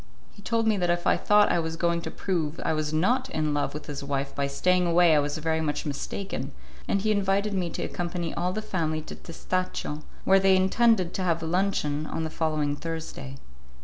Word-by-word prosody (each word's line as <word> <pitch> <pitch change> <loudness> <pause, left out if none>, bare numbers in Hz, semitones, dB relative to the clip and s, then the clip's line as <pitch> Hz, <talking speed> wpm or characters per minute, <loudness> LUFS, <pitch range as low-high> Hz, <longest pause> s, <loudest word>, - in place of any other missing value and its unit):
He 205 - -15
told 230 +1 0
me 220 -2 +3
that 175 -2 0
if 175 0 0
I - - +4
thought 210 0 +4
I 175 - +2
was 160 0 -2
going 170 0 0
to - - -5
prove 165 -5 -2
I - - +2
was 155 -1 -1
not 245 +12 +1
in 155 - -1
love 145 0 -1
with 150 - -6
his 145 -1 -6
wife 140 0 -2
by 140 0 -1
staying 180 +5 +2
away 170 -1 +5
I - - +5
was 145 +1 -1
very 160 0 0
much 150 -2 -2
mistaken, 155 +7 -4 0.3
and 200 - +1
he 215 +1 +1
invited 200 0 +1
me 180 -3 -1
to - - -4
accompany 175 -1 -3
all 180 +1 -1
the 215 +3 -3
family 160 -6 -1
to - - -8
Testaccio, 170 -3 -3 0.2
where 195 0 +5
they 190 0 +5
intended 190 0 +3
to - - -3
have 170 -2 0
luncheon 160 -4 0
on 160 - -3
the 160 - -3
following 155 -3 0
Thursday. 160 -4 -6
170 Hz, 215 wpm, -27 LUFS, 155-190 Hz, 0.3 s, away